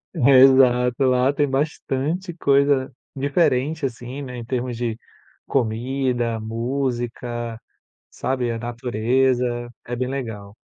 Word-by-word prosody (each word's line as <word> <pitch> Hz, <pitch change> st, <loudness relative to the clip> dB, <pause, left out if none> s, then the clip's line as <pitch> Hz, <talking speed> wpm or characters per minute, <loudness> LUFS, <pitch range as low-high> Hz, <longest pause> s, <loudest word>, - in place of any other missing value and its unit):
É, 135 Hz, -3 st, +6 dB
exato. 130 Hz, -1 st, +5 dB
Lá 130 Hz, +1 st, +3 dB
tem 145 Hz, 0 st, +1 dB
bastante 150 Hz, +5 st, -2 dB
coisa 140 Hz, -3 st, +2 dB, 0.2 s
diferente 140 Hz, +1 st, +1 dB
assim, 125 Hz, +3 st, -5 dB
né, 125 Hz, -2 st, -7 dB
em 120 Hz, -, -7 dB
termos 125 Hz, 0 st, -2 dB
de 115 Hz, -1 st, -3 dB, 0.5 s
comida, 120 Hz, -1 st, -1 dB
música, 120 Hz, 0 st, -3 dB, 0.5 s
sabe, 130 Hz, -2 st, -2 dB
a 115 Hz, -, -4 dB
natureza, 120 Hz, +2 st, 0 dB, 0.4 s
é 120 Hz, -, -4 dB
bem 125 Hz, +1 st, -2 dB
legal. 110 Hz, -7 st, -5 dB
125 Hz, 110 wpm, -22 LUFS, 120-135 Hz, 0.5 s, É